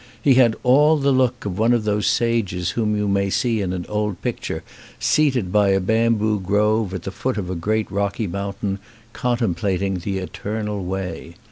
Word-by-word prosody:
He 140 - +4
had 120 -3 +5
all 150 +5 +5
the 140 -1 +2
look 130 -3 +1
of 100 -1 -3
one 115 +2 +4
of 120 -2 +1
those 105 -1 0
sages 100 -7 0
whom 105 -2 0
you 105 0 0
may 100 0 +1
see 115 +1 0
in 95 -2 -2
an 90 -1 -4
old 105 -2 -2
picture - - -3 0.4
seated 130 -11 +2
by 105 0 +4
a 95 0 +3
bamboo 110 +1 +1
grove 105 +2 +1
at 90 - -5
the 95 - -4
foot 130 +5 -2
of 90 -3 -3
a - - -2
great 110 +6 -1
rocky 100 +2 -1
mountain 100 +1 -3 0.3
contemplating 100 -5 -1
the 95 +3 -3
Eternal 105 +2 -4
Way. 90 -2 -5
105 Hz, 180 wpm, -21 LUFS, 95-115 Hz, 0.4 s, had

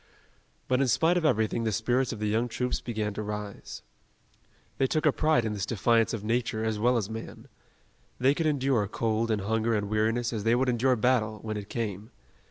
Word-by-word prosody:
But 130 +1 +2
in 135 - +2
spite 165 +7 +3
of 175 -2 0
everything 110 -4 +1
the 110 - 0
spirits 120 +4 0
of 115 - -5
the 105 - -3
young 110 +3 +1
troops 125 +1 -2
began 110 -3 -3
to 110 - -4
rise. 105 -1 -6 1.0
They 135 - +3
took 155 +4 0
a 150 - +6
pride 155 -5 +2
in 110 - -1
this 100 -2 -4
defiance 115 +2 +2
of 115 -3 -4
nature 110 0 -1
as 110 -1 -1
well 120 +3 +3
as 105 -4 -1
man. 110 +1 -8 0.7
They 130 +2 +4
could 160 +1 -1
endure 135 -7 +1
cold 115 +2 -1
and 110 -2 0
hunger 110 +3 0
and 105 -1 -2
weariness 115 +3 0
as 105 -3 -3
they 115 +2 +3
would 130 +1 +1
endure 125 +2 +2
battle, 110 -2 +1
when 110 -1 -4
it 105 -1 -6
came. 110 -2 -4
115 Hz, 205 wpm, -28 LUFS, 110-125 Hz, 1.0 s, a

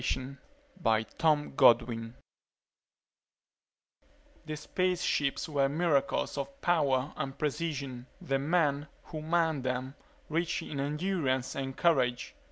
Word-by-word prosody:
net 130 +1 -7 0.5
_The 115 -1 +3 2.4
space 180 +3 -1
ships 140 +3 0
were 140 -3 +2
miracles 140 -3 +1
of 140 0 -6
power 140 -5 +2
and 135 -2 -4
precision; 140 -5 -3
the 135 -7 -1
men 145 -1 +1 0.2
who 155 - -7
manned 160 -3 +1
them, 130 +1 -2 0.3
rich 165 +2 -1
in 140 - -5
endurance 140 -4 -1
and 135 -1 -4
courage. 125 -8 +2
140 Hz, 95 wpm, -30 LUFS, 130-160 Hz, 2.4 s, The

